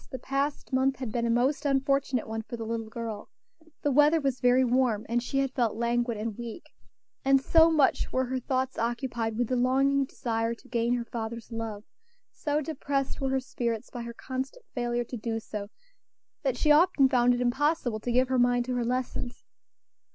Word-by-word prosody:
the 260 Hz, -, -5 dB
past 275 Hz, +1 st, -2 dB
month 265 Hz, +1 st, +2 dB
had 255 Hz, -4 st, -5 dB
been 235 Hz, +1 st, 0 dB
a -, -, -1 dB
most 255 Hz, +5 st, +2 dB
unfortunate 275 Hz, -3 st, +1 dB
one 220 Hz, 0 st, -3 dB
for 235 Hz, +2 st, -7 dB
the 225 Hz, -, -5 dB
little 225 Hz, 0 st, -3 dB
girl; 225 Hz, -2 st, -6 dB, 0.5 s
the 290 Hz, -, +2 dB
weather 295 Hz, +4 st, +5 dB
was 270 Hz, -3 st, -1 dB
very 250 Hz, +1 st, +4 dB
warm, 245 Hz, -4 st, +1 dB
and 240 Hz, +1 st, +1 dB
she 260 Hz, +3 st, -3 dB
had 270 Hz, -1 st, +1 dB
felt 235 Hz, -5 st, +1 dB
languid 235 Hz, 0 st, 0 dB
and 220 Hz, +1 st, -4 dB
weak, 235 Hz, +7 st, -8 dB, 0.5 s
and 270 Hz, 0 st, +5 dB
so 325 Hz, +4 st, +5 dB
much 305 Hz, -4 st, +2 dB
were 260 Hz, 0 st, +1 dB
her 260 Hz, +1 st, -2 dB
thoughts 260 Hz, +1 st, -2 dB
occupied 230 Hz, -1 st, -2 dB
with 245 Hz, -1 st, +1 dB
the 255 Hz, -, 0 dB
longing 270 Hz, +3 st, +3 dB
desire 230 Hz, -3 st, -2 dB
to 255 Hz, -, -20 dB
gain 240 Hz, -1 st, +1 dB
her 240 Hz, -1 st, -3 dB
father's 230 Hz, 0 st, -6 dB
love, 225 Hz, -2 st, -5 dB, 0.5 s
so 300 Hz, -1 st, -1 dB
depressed 280 Hz, -3 st, -2 dB
were 270 Hz, -, 0 dB
her 265 Hz, 0 st, +1 dB
spirits 240 Hz, -3 st, -3 dB
by 245 Hz, -, -6 dB
her 235 Hz, 0 st, -6 dB
constant 265 Hz, -, -5 dB
failure 240 Hz, -1 st, -1 dB
to 245 Hz, +1 st, -7 dB
do 225 Hz, 0 st, -3 dB
so, 210 Hz, -2 st, -6 dB, 0.7 s
that 265 Hz, -4 st, 0 dB
she 300 Hz, -, +3 dB
often 300 Hz, -3 st, +5 dB
found 245 Hz, -2 st, +3 dB
it -, -, -3 dB
impossible 250 Hz, -1 st, +1 dB
to 240 Hz, +3 st, -3 dB
give 255 Hz, +2 st, +3 dB
her 260 Hz, -1 st, +1 dB
mind 245 Hz, 0 st, +3 dB
to 255 Hz, -, -2 dB
her 245 Hz, -1 st, 0 dB
lessons. 250 Hz, 0 st, -3 dB
245 Hz, 195 wpm, -28 LUFS, 235-270 Hz, 0.7 s, weather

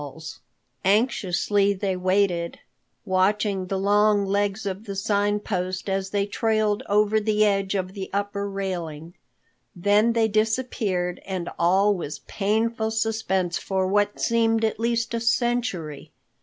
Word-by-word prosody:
Anxiously 200 Hz, -1 st, +2 dB
they 195 Hz, -1 st, -2 dB
waited, 180 Hz, -2 st, 0 dB, 0.5 s
watching 190 Hz, 0 st, +1 dB
the 195 Hz, -, -2 dB
long 205 Hz, +1 st, +3 dB
legs 200 Hz, +1 st, -1 dB
of 195 Hz, +2 st, -4 dB
the 200 Hz, -2 st, -5 dB
Sign 205 Hz, +1 st, +1 dB
Post 185 Hz, -2 st, -3 dB
as 195 Hz, 0 st, -1 dB
they 200 Hz, 0 st, 0 dB
trailed 215 Hz, +1 st, 0 dB
over 210 Hz, +1 st, +3 dB
the 215 Hz, 0 st, +2 dB
edge 195 Hz, -1 st, +1 dB
of 185 Hz, -1 st, -2 dB
the 195 Hz, -2 st, -6 dB
upper 200 Hz, 0 st, -2 dB
railing. 175 Hz, -5 st, -5 dB, 0.6 s
Then 205 Hz, +5 st, +3 dB
they 225 Hz, -1 st, +3 dB
disappeared 215 Hz, -5 st, -1 dB
and 185 Hz, -3 st, -4 dB
all 190 Hz, +4 st, +4 dB
was 165 Hz, -6 st, -5 dB
painful 220 Hz, +2 st, 0 dB
suspense 220 Hz, -5 st, -1 dB
for 190 Hz, -1 st, -1 dB
what 205 Hz, +2 st, +1 dB
seemed 225 Hz, -1 st, +2 dB
at 220 Hz, -, -2 dB
least 235 Hz, 0 st, 0 dB
a 230 Hz, -, 0 dB
century. 230 Hz, -, -1 dB
200 Hz, 130 wpm, -24 LUFS, 190-215 Hz, 0.6 s, all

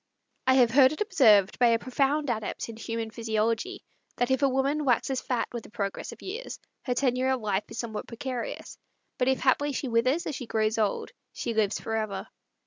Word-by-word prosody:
I 260 Hz, -, +6 dB
have 245 Hz, -3 st, +5 dB
heard 260 Hz, +1 st, +6 dB
it 310 Hz, -, -7 dB
observed 220 Hz, -, +4 dB
by 245 Hz, -, +6 dB
a 230 Hz, -1 st, +4 dB
profound 275 Hz, +3 st, 0 dB
adept 220 Hz, 0 st, -4 dB
in 230 Hz, -, -7 dB
human 225 Hz, 0 st, -4 dB
physiology, 230 Hz, -, -1 dB, 0.3 s
that 245 Hz, +1 st, 0 dB
if 265 Hz, -, +2 dB
a 275 Hz, -, +4 dB
woman 275 Hz, +3 st, +1 dB
waxes 260 Hz, 0 st, +1 dB
fat 250 Hz, -2 st, -1 dB
with 235 Hz, -2 st, -4 dB
the -, -, -13 dB
progress 200 Hz, -3 st, -4 dB
of -, -, -12 dB
years, 440 Hz, +6 st, -6 dB, 0.3 s
her 250 Hz, -, 0 dB
tenure 255 Hz, 0 st, +1 dB
of 260 Hz, -2 st, 0 dB
life 205 Hz, -1 st, -1 dB
is -, -, -9 dB
somewhat 225 Hz, -2 st, -4 dB
precarious, 245 Hz, 0 st, -5 dB, 0.4 s
but 250 Hz, -, +2 dB
if 265 Hz, 0 st, +2 dB
haply 285 Hz, +2 st, +2 dB
she 270 Hz, -, -2 dB
withers 255 Hz, +9 st, +2 dB
as 300 Hz, -, -3 dB
she 255 Hz, -3 st, -6 dB
grows 220 Hz, 0 st, 0 dB
old, 210 Hz, -2 st, 0 dB, 0.2 s
she 235 Hz, -, -3 dB
lives 215 Hz, -2 st, +1 dB
forever. 215 Hz, -3 st, -3 dB
245 Hz, 200 wpm, -28 LUFS, 220-265 Hz, 0.4 s, I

